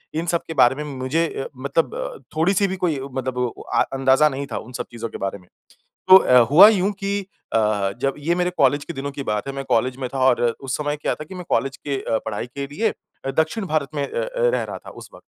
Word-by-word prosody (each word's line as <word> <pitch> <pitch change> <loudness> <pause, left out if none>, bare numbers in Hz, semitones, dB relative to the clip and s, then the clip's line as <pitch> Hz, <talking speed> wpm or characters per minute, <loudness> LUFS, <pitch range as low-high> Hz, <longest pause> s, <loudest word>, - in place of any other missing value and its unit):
इन 165 +2 -1
सब 170 -1 +1
के 160 - -4
बारे 120 +2 +4
में 150 - -4
मुझे 145 +6 0 0.2
अ, - - -5
मतलब 140 0 -2
थोड़ी-सी 195 +5 +3
भी 190 - -3
कोई 160 -4 0
अ, 135 - -6
मतलब 130 -1 -3
वो 125 -1 +1 0.2
अ, - - +4
अंदाजा 135 +3 +4
नहीं 140 0 -5
था - - -1
उन 120 - -8
सब - - -3
चीज़ों 115 -1 -5
के - - -7
बारे 95 0 -3
में। 90 - -22 0.6
तो 185 - +11
अ, 125 -8 +5
हुआ 175 +8 +10
यूँ 205 -1 +2
कि 200 0 -1 0.3
अ, - - +3 0.4
जब 135 -1 +1
ये 165 +4 0
मेरे 180 0 0
कॉलेज 140 +2 +3
के 170 - -6
दिनों 140 -1 -4
की 140 - -5
बात 105 +4 -2
है। - - -3
मैं 135 0 -4
कॉलेज 125 +2 +1
में 130 - -3
था - - -2
और 125 -2 +3 0.2
उस 135 -1 -3
समय 145 0 -1
क्या 150 - -1
था 150 - -8
कि 185 - -11
मैं 180 - -7
कॉलेज 135 0 0
के 140 -2 -3
अ, 110 - 0
पढ़ाई 110 +1 -4
के 140 - -3
लिए 205 +10 -1 0.5
दक्षिण 175 +7 +1
भारत 155 -4 0
में 145 - -1
अ, - - -12
अ, - - -3 0.3
रहा - - -3
था - - -12
उस - - -11
वक़्त। - - -16
140 Hz, 255 wpm, -22 LUFS, 130-165 Hz, 0.6 s, तो